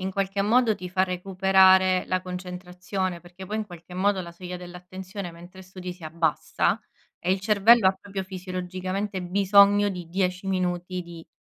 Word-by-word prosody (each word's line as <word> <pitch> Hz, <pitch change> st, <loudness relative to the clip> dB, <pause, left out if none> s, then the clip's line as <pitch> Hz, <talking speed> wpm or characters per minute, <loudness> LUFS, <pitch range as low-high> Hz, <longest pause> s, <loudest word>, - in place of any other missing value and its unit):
in 190 Hz, +1 st, -2 dB
qualche 195 Hz, +1 st, -1 dB
modo 225 Hz, +2 st, +3 dB
ti 180 Hz, -2 st, -7 dB
fa 185 Hz, +1 st, +1 dB
recuperare 190 Hz, 0 st, +4 dB
la 185 Hz, 0 st, -1 dB
concentrazione, 180 Hz, 0 st, -5 dB
perché 180 Hz, +2 st, -12 dB
poi 210 Hz, +3 st, -4 dB
in 215 Hz, -1 st, -3 dB
qualche 175 Hz, -2 st, -13 dB
modo 195 Hz, +1 st, +1 dB
la 170 Hz, -1 st, -9 dB
soglia 180 Hz, +1 st, -7 dB
dell'attenzione 180 Hz, +1 st, -8 dB
mentre 175 Hz, +3 st, -13 dB
studi 185 Hz, -1 st, -8 dB
si 175 Hz, -2 st, -13 dB
abbassa, 160 Hz, 0 st, 0 dB, 0.4 s
e 180 Hz, -, -2 dB
il 190 Hz, -, -1 dB
cervello 210 Hz, +1 st, +5 dB
ha -, -, +2 dB
proprio 195 Hz, -1 st, -5 dB
fisiologicamente 185 Hz, +1 st, -4 dB
bisogno 200 Hz, +2 st, +5 dB
di 175 Hz, -3 st, -7 dB
10 185 Hz, +1 st, -1 dB
minuti 180 Hz, -1 st, -1 dB
di 170 Hz, -1 st, -11 dB
185 Hz, 165 wpm, -25 LUFS, 180-195 Hz, 0.4 s, cervello